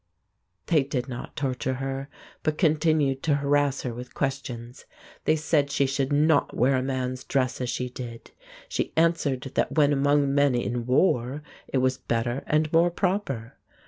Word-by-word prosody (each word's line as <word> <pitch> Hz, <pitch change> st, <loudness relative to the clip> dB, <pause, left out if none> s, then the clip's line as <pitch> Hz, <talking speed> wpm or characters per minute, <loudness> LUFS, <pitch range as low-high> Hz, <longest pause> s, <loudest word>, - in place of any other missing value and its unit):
They 155 Hz, -3 st, +3 dB
did 135 Hz, -2 st, -3 dB
not 120 Hz, -2 st, -7 dB
torture 130 Hz, -1 st, -2 dB
her, 135 Hz, +1 st, -4 dB, 0.3 s
but 155 Hz, -1 st, -1 dB
continued 155 Hz, -5 st, +2 dB
to 150 Hz, -3 st, +2 dB
harass 145 Hz, -1 st, +1 dB
her 125 Hz, -, -3 dB
with 125 Hz, +2 st, -9 dB
questions. 130 Hz, -3 st, -4 dB, 0.4 s
They 155 Hz, -, +4 dB
said 150 Hz, -2 st, +1 dB
she 140 Hz, -, +2 dB
should 135 Hz, +1 st, -1 dB
not 150 Hz, +1 st, +3 dB
wear 130 Hz, +1 st, +3 dB
man's 130 Hz, -1 st, -2 dB
dress 130 Hz, -2 st, -1 dB
as 125 Hz, -, -2 dB
she 125 Hz, -, -2 dB
did. 120 Hz, -2 st, -8 dB, 0.4 s
She -, -, -2 dB
answered 160 Hz, -5 st, +2 dB
that -, -, 0 dB
when 145 Hz, -2 st, +4 dB
among 140 Hz, 0 st, +2 dB
men 140 Hz, -2 st, +3 dB
in 120 Hz, 0 st, -2 dB
war 130 Hz, 0 st, +2 dB, 0.2 s
it -, -, -1 dB
was 130 Hz, 0 st, +1 dB
better 120 Hz, +3 st, -1 dB
and 155 Hz, +1 st, +1 dB
more 170 Hz, +2 st, +5 dB
proper. 175 Hz, -, -2 dB
135 Hz, 160 wpm, -26 LUFS, 125-150 Hz, 0.4 s, more